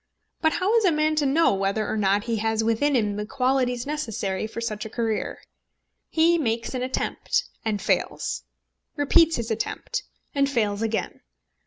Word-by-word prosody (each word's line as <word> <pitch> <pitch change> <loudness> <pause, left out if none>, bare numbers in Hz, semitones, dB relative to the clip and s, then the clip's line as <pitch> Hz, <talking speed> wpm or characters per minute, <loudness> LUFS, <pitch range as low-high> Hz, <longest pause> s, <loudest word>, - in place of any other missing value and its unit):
But 315 -1 +3
how 395 +5 +1
is 450 - +3
a 365 - +5
man 310 0 +2
to 290 -2 +3
know 315 +1 +4
whether 195 +2 0
or - - -1
not 200 -1 +2
he 230 -1 -1
has 220 +1 0
within 230 +6 +2
him 210 -4 +1
the 210 - -2
qualities 250 -1 +1
necessary 220 -9 -2
for 220 - -7
such 215 -3 -3
a 220 - -6
career? 225 -1 -2 0.7
He 335 +1 +4
makes 230 -4 -1
an 255 - -2
attempt, 260 - -1 0.2
and 215 -2 -1
fails; 215 - -1 0.5
repeats 325 +2 +4
his 230 -1 -3
attempt, 230 - -2 0.3
and 280 -1 +2
fails 215 -6 0
again! 225 0 -2
235 Hz, 170 wpm, -25 LUFS, 215-295 Hz, 0.7 s, a